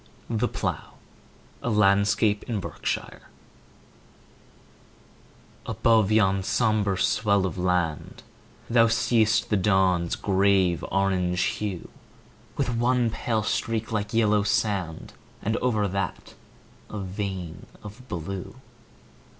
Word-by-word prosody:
The 115 +2 +1
Plough - - -4 0.7
A - - -2
LANDSCAPE 105 0 +3
IN 110 -3 -1
BERKSHIRE - - -4 2.5
ABOVE 110 -3 +2
yon 100 -3 +3
sombre 105 -1 +1
swell 100 0 +2
of 95 - -3
land 90 -4 -1 0.4
Thou 115 -1 +4
see'st 115 -2 +2
the 105 - +3
dawn's 95 -3 +2
grave 95 -3 +2
orange 95 -2 +1
hue, 100 -5 -3 0.7
With 120 - 0
one 120 -1 +2
pale 110 -1 -1
streak 110 0 -2
like 105 -1 -2
yellow 105 -3 +3
sand, 95 -5 -1 0.3
And 110 +2 0
over 110 -5 +1
that 95 -1 -4 0.6
a 110 - -6
vein 95 -3 -5 0.2
of 110 +5 -11
blue. 95 -1 -6
100 Hz, 100 wpm, -25 LUFS, 95-110 Hz, 2.5 s, Thou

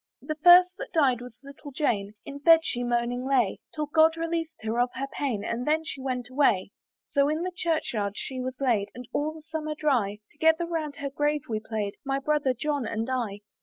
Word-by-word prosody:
"The 310 - -2
first 360 +1 +9
that - - -6
died 265 -7 +3
was 245 -1 -11
little 280 +1 -11
Jane; 215 -8 -1
"In 280 0 -7
bed 325 +3 +7
she 245 -4 -2
moaning 240 +1 0
lay, 255 -7 +1 0.2
"Till 305 -1 -1
God 320 +2 +4
released 330 -1 -3
her 225 +2 -1
of 245 +1 +3
her 270 - -2
pain, 240 -8 -2
"And 235 +4 -3
then 315 +1 +2
she 280 -4 -6
went 250 -2 -3
away. 245 -8 +2 0.3
"So 280 0 +1
in 310 +3 -1
the 365 0 -3
church 330 -7 -1
yard 200 -3 -1
she 260 -1 -4
was 255 0 -4
laid, 230 -7 +1
"And 250 0 -9
all 300 +1 0
the 315 -1 -12
summer 310 -1 -4
dry, 245 -10 +1
"Together 320 +2 +3
round 320 -4 -3
her 280 -1 -5
grave 295 +1 0
we 220 -2 -2
played, 215 -2 -4
"My 270 -1 -1
brother 275 -2 +1
John 285 -1 -1
and 225 +3 -2
I. 220 -6 -2
275 Hz, 210 wpm, -27 LUFS, 240-310 Hz, 0.3 s, first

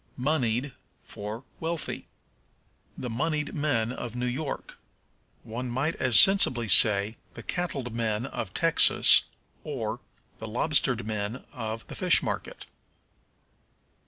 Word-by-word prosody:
Moneyed 130 -2 0 0.3
for 105 +4 -7 0.2
Wealthy. 165 -1 -4 0.9
"The 125 - -5
moneyed 150 +6 -2
men 125 -7 0
of 120 -2 -6
New 125 0 -2
York." 135 +4 -5 0.6
One 120 +3 -5
might 135 +7 -1
as 125 -4 +5
sensibly 130 - +4
say, 105 +1 +4 0.2
"The - - -9
cattled 140 -9 -3
men 115 0 -1
of 110 -7 -5
Texas," 165 +8 +5 0.4
or, - - -4 0.4
"The 110 - -6
lobstered 125 0 0
men 110 +3 -4
of 115 -3 -5
the - - -10
fish - - +3
market." - - -5
125 Hz, 115 wpm, -27 LUFS, 110-145 Hz, 0.9 s, as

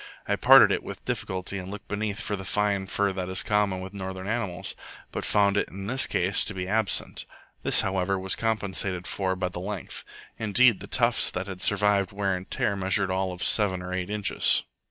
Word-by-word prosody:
I - - +1
parted - - +7
it - - 0
with - - -9
difficulty 95 +1 -3
and 95 0 -8
looked 105 +1 -9
beneath 105 0 -3
for 110 -3 -3
the 95 - -7
fine 100 0 0
fur 100 0 0
that 95 -1 -4
is 95 0 0
common 105 -3 0
with 95 +1 -8
northern 95 -1 -6
animals, 100 -5 -2 0.4
but - - -4
found 100 -1 +2
it - - 0
in 95 +1 -8
this 130 +6 +2
case 95 +2 +1
to 110 - -5
be 90 -1 -4
absent. 110 0 0 0.3
This, - - +6
however, 95 0 0
was 95 0 -2
compensated 100 -5 -1
for 95 -1 -1
by 90 -1 -2
the 90 - -7
length. 100 0 -6 0.4
Indeed, 110 0 +4
the 100 - -9
tufts 120 0 +2
that 90 +1 -4
had 95 -2 -8
survived 100 -1 +2
wear 100 -1 -1
and 90 +1 -8
tear 100 - 0
measured 95 0 +1
all 95 0 -1
of 90 -1 -6
seven 95 -4 +4
or 90 0 -5
eight 90 0 -3
inches. 105 -1 +1
95 Hz, 205 wpm, -26 LUFS, 95-105 Hz, 0.4 s, parted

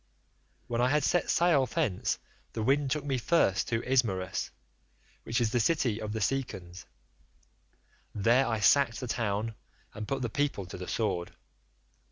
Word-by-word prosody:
"When 120 0 -1
I 125 - +4
had 150 +1 +2
set 175 +4 +1
sail 165 -7 +3
thence 100 -5 -1 0.4
the 110 - -2
wind 135 +3 +2
took 150 +1 -1
me 135 -3 0
first 115 - +2
to 115 -1 -1
Ismarus, 100 -8 0 0.7
which 115 - -1
is 115 -2 +1
the 120 - +2
city 120 -4 +1
of 105 -1 -4
the 110 - -3
Cicons. 95 -7 -3 1.3
There 120 +6 +3
I 115 -2 -1
sacked 120 +2 +4
the 130 - -4
town 110 -1 -1 0.4
and 105 0 -6
put 135 -1 -2
the - - +1
people 140 -4 -1
to 90 - -8
the 90 - -6
sword. 95 -6 -2
115 Hz, 160 wpm, -30 LUFS, 105-135 Hz, 1.3 s, I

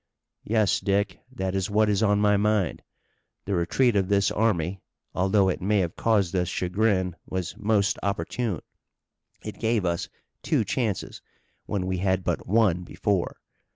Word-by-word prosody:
"Yes, 110 -2 +2
Dick. 100 -1 0
That 95 -7 -3
is 95 0 -1
what 105 +1 +3
is 105 0 +1
on 105 -2 +3
my 105 0 +4
mind. 105 -3 +1 0.6
The 100 - -2
retreat 105 +7 +2
of 95 -2 +2
this 100 -1 +3
army, 95 -4 0 0.3
although 95 +1 +3
it 95 - -1
may 105 +3 +2
have 85 -2 -3
caused 100 -5 +1
us 90 -1 +1
chagrin, 95 -1 0
was 95 -2 -4
most 105 -1 +1
opportune. 100 +1 -2 0.8
It - - -7
gave 110 -3 +1
us 85 -1 -1 0.3
two - - +1
chances, 105 +1 -2 0.5
when 100 -3 -2
we 95 -1 -1
had 95 0 +1
but - - -2
one 100 -4 +3
before. 95 0 -2
100 Hz, 155 wpm, -26 LUFS, 90-105 Hz, 0.8 s, my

